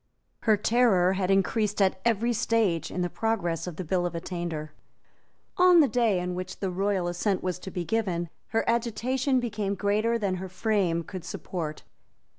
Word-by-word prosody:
Her 215 -2 +3
terror 205 -5 +3
had 190 -1 -1
increased 205 +2 +1
at 190 -1 +2
every 235 +1 +2
stage 220 -7 +1
in 180 - -3
the - - +1
progress 190 -8 -1
of 175 - -5
the 185 - -4
Bill 175 +1 0
of 175 - -7
Attainder. 165 -3 -4 0.8
On 360 -1 +7
the 300 - +6
day 230 -7 +2
on 180 0 -3
which 185 +1 -5
the 190 -2 -2
royal 190 -1 0
assent 180 +2 -1
was 180 -1 -2
to 190 - -7
be 180 -2 -4
given, 175 -4 -1 0.2
her 225 - -1
agitation 250 +3 +1
became 210 -4 -2
greater 215 +4 +1
than 195 -4 -1
her 190 +1 -6
frame 185 -3 0
could 185 0 -7
support. 165 -3 -5
195 Hz, 175 wpm, -27 LUFS, 180-225 Hz, 0.8 s, On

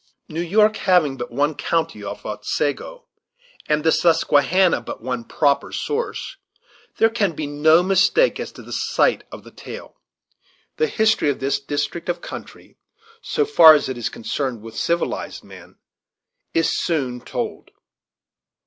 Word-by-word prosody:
New 160 +2 -4
York 210 +5 +3
having 175 -8 +2
but 120 -2 -6
one 145 +5 0
county 160 -9 -2
of 100 - -7
Otsego, 145 - -3 0.6
and 150 0 +1
the 160 - +3
Susquehanna 170 0 +3
but 115 - -8
one 125 -1 -3
proper 140 +3 0
source, 450 -2 -4 0.6
there 225 - +5
can 205 -6 0
be 155 0 -4
no 155 +4 +4
mistake 195 - +3
as - - -5
to - - -12
the - - -12
site - - +1
of - - -10
the - - -14
tale. - - -11 0.8
The 460 - +2
history 220 - +2
of 140 - -2
this 135 +1 0
district 145 +5 -4
of 175 - -1
country, - - -11 0.4
so 450 -3 0
far 160 - +8
as 145 - -1
it 130 - -3
is 120 -2 -3
connected 120 -1 -4
with 115 0 -10
civilized 170 +8 -2
men, - - -14 0.8
is 165 - +1
soon 130 -7 -2
told. - - -5
155 Hz, 150 wpm, -21 LUFS, 140-190 Hz, 0.8 s, far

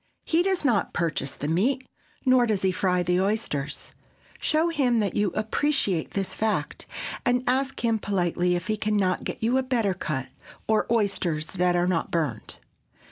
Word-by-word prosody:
He 330 +1 +3
does 375 -3 0
not 230 -7 +2
purchase 160 -5 -1
the 145 - -4
meat, 245 - +1 0.4
nor 255 -2 +5
does 210 -4 0
he 190 - +3
fry 180 -1 +1
the 180 +1 +2
oysters. 195 -9 -2 0.5
Show 315 +2 +2
him 260 -8 +2
that 205 -3 0
you 205 -1 +2
appreciate 215 - 0
this 195 -1 -2
fact, 220 -1 -2 0.4
and 245 +1 +2
ask 265 0 0
him 225 -1 +2
politely 180 -3 +1
if 175 0 -3
he 215 0 -1
can 210 0 0
not 185 -2 +1
get - - -5
you 245 +4 +3
a - - +2
better 240 -7 +1
cut, 150 -7 -3 0.4
or 220 -1 +2
oysters 195 -8 0
that 180 0 +1
are 175 0 +2
not 180 -2 0
burned. 150 -10 -2
205 Hz, 175 wpm, -26 LUFS, 180-245 Hz, 0.5 s, nor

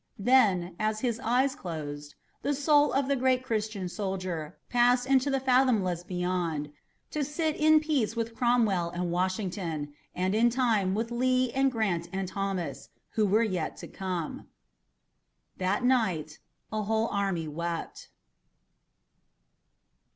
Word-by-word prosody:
Then, 200 -7 +3
as 215 0 0
his 235 -3 -1
eyes 255 +4 +2
closed, 150 - -6 0.3
the 285 +1 0
soul 290 +1 +4
of 275 0 +1
the 280 - +2
great 255 0 +2
Christian 215 -5 -2
soldier 185 -4 -4
passed 245 +1 +3
into 270 +1 +3
the 270 -1 +1
fathomless 250 -9 +2
beyond, 175 -5 -2 0.4
to 300 - -1
sit 305 +2 -1
in 310 0 +5
peace 280 -8 0
with 230 0 -2
Cromwell 225 -8 +2
and 175 0 -3
Washington, 180 -5 -2 0.2
and 185 +2 0
in 230 +3 +4
time 225 -6 +1
with 225 +2 -2
Lee 255 +1 +2
and 270 +1 +2
Grant 195 -8 -1
and 195 -1 -2
Thomas, 185 -7 -3 0.2
who 215 -2 +2
were 215 +4 +3
yet 185 -7 -2
to - - -8
come. 180 -4 -4 1.1
That 190 +5 0
night 185 -12 +1 0.3
a 215 0 -1
whole 220 +2 +1
army 195 -5 -1
wept. 170 +2 -5
215 Hz, 135 wpm, -28 LUFS, 180-255 Hz, 1.1 s, in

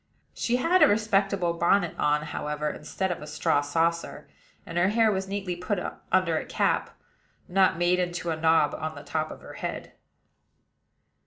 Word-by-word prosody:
She 240 - 0
had 335 +9 +3
a - - +9
respectable 200 -4 +1
bonnet 175 +1 +2
on, 150 0 +2
however, 150 0 -3
instead 190 +5 -3
of 175 - -4
a 150 - -8
straw 145 -1 +1
saucer; 165 +3 -1 0.4
and 170 +1 -3
her 180 - +4
hair 220 +1 +3
was 190 -1 -2
neatly 195 -2 -3
put 180 +4 -2 0.3
under 185 -4 +2
a - - -7
cap, - - 0 0.5
not 185 -1 +3
made 175 +1 +2
into 175 -1 -2
a - - -1
knob 160 -1 +3
on 155 0 -4
the 145 - -9
top 155 0 -2
of - - -10
her - - -11
head. - - -5
175 Hz, 170 wpm, -27 LUFS, 160-195 Hz, 0.5 s, a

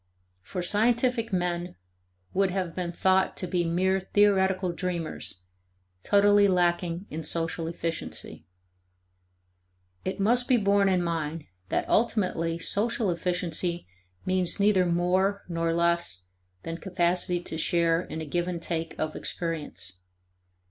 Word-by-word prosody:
For 180 - -5
scientific 230 +4 +2
men 175 -1 -1 0.6
would 195 0 +2
have 180 -3 -2
been 175 -1 -3
thought 190 +2 +2
to - - -3
be 175 0 0
mere 185 +3 +1
theoretical 190 -2 +2
dreamers, 170 - -4 0.6
totally 205 - +5
lacking 175 -1 +1
in 160 +1 -4
social 165 +1 -1
efficiency. 165 0 -5 1.6
It 190 +2 -3
must 240 +5 +2
be 255 - +4
borne 200 -2 +3
in 180 -2 +2
mind 165 -2 -2 0.3
that - - 0
ultimately 185 -7 +1
social 205 +3 0
efficiency 175 - -2 0.4
means 185 -1 +1
neither 200 -3 +4
more 185 +3 +1
nor 165 -1 -1
less 170 - 0 0.4
than 165 0 -4
capacity 180 -1 +1
to 170 - -6
share 165 0 +2
in 160 -3 -6
a - - -4
give 175 +4 -1
and 175 -2 -3
take 165 -1 -3
of 155 0 -2
experience. 150 - -4
180 Hz, 125 wpm, -27 LUFS, 165-190 Hz, 1.6 s, totally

